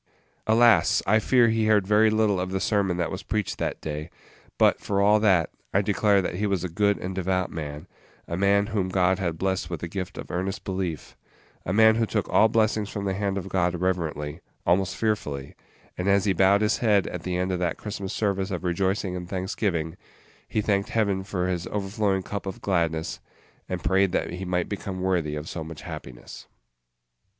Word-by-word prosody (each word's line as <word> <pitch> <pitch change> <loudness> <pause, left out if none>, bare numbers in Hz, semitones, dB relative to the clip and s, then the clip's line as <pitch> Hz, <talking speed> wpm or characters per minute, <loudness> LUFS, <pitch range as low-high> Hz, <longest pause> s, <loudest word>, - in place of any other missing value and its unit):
Alas! 115 +1 +5
I 110 +3 +4
fear 120 +1 +4
he 110 -1 +1
heard 105 -3 +4
very 105 +2 +4
little 110 -3 +2
of 90 0 -2
the 95 0 -1
sermon 95 -3 +1
that 85 -2 -1
was 95 0 -4
preached 105 -3 -2
that - - -2
day; 75 +1 -5 0.5
but, - - +4
for 100 -1 -1
all 105 +2 +5
that, 95 -6 +3 0.2
I 100 - +4
declare 100 -1 +3
that 90 - -2
he 105 +2 0
was 95 -3 -1
a 90 - -2
good 100 +4 +2
and 95 +1 -5
devout 95 0 -1
man; 75 0 -6 0.4
a 85 - -3
man 100 +2 +3
whom 95 -4 0
God 95 0 +2
had 85 -4 -2
blessed 95 -1 -1
with 85 -3 -4
the 85 - -3
gift 90 +1 -5
of - - -7
earnest 95 +2 -3
belief; 95 -5 -4 0.5
a - - 0
man 110 +2 +5
who 115 -1 +1
took 105 -2 -1
all 110 - +5
blessings 110 -2 +1
from 100 -1 -4
the 95 - 0
hand 100 0 -1
of 95 - -4
God 90 -2 +1
reverently, 80 -4 -2 0.3
almost 95 +2 +2
fearfully; 75 -11 -2 0.4
and 90 - -3
as 100 0 +3
he 100 - +3
bowed 95 +3 +4
his 105 - +2
head 105 -6 +3
at 90 - -5
the 90 0 -2
end 90 +1 -1
of 90 - -1
that 85 -2 -1
Christmas 100 -2 -5
service 100 -2 -1
of 90 -2 -4
rejoicing 95 +1 0
and 90 -1 -6
thanksgiving, 90 -3 -2 0.5
he 110 - 0
thanked 100 +1 0
Heaven 100 -5 0
for 90 -2 -2
his 90 -2 -2
overflowing 100 -1 -1
cup 100 0 -5
of 95 - -5
gladness, 85 -3 -1 0.5
and 90 -1 -3
prayed 95 -1 +2
that - - 0
he 90 +2 -5
might 90 -1 -1
become 95 -1 -5
worthy 90 -5 0
of 75 +1 -6
so 80 - -5
much 80 0 -9
happiness. 65 -2 -9
95 Hz, 200 wpm, -25 LUFS, 90-100 Hz, 0.5 s, Alas